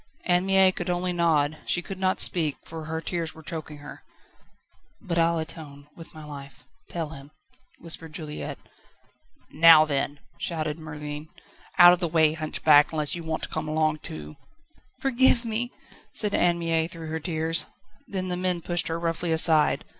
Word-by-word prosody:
Anne 180 +1 +2
Mie 190 -1 +5
could 175 -1 -5
only 180 0 -1
nod; 155 -3 +1
she 175 - +1
could 190 +1 -8
not 190 0 0
speak, 155 -5 +3
for 160 -1 -8
her 160 +1 -3
tears 165 -1 -4
were 160 - -13
choking 155 0 -7
her. 145 0 -11 1.0
"But 170 -6 -2
I'll 165 0 +2
atone 150 -3 -7
with 165 -1 -12
my 155 -1 -10
life. 140 -2 -11 0.2
Tell 165 -3 -4
him," 140 -2 -11 0.5
whispered 165 -1 0
Juliette. 150 -1 -6 0.9
"Now 160 -1 +7
then," 145 -1 -2 0.2
shouted 155 -2 -3
Merlin, 150 0 -7 0.5
"out 175 0 +9
of 180 - -1
the 175 - -1
way, 160 -1 +3
hunchback, 155 -2 +3
unless 150 -2 0
you 175 - -4
want 160 -1 -4
to - - -4
come 155 -1 -4
along 155 0 0
too." 75 - -9 0.6
"Forgive 260 -2 +3
me," 230 +2 -2 0.4
said 210 -2 -1
Anne 175 -1 +3
Mie 165 -1 0
through 165 -2 -9
her 160 +1 -3
tears. 160 0 -1 0.4
Then 185 -2 -4
the 180 - -1
men 180 -1 -1
pushed 175 -1 -1
her 165 0 -2
roughly 170 0 -2
aside. 160 -1 +3
160 Hz, 170 wpm, -25 LUFS, 155-175 Hz, 1.0 s, out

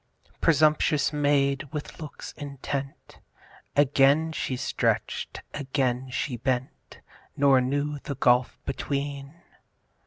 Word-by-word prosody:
Presumptuous 155 -1 +3
Maid! 145 -1 +2
with 150 +1 -6
looks 150 - -8
intent 140 -1 -6 0.6
Again 145 +3 +4
she 130 -4 -2
stretch'd, 130 - -1
again 130 -2 -1
she 125 0 -2
bent, 130 +1 -3 0.4
Nor 135 -2 +5
knew 145 +3 -1
the 140 - -5
gulf 125 -1 +3
between. 140 +1 -3
140 Hz, 95 wpm, -26 LUFS, 130-145 Hz, 0.6 s, Nor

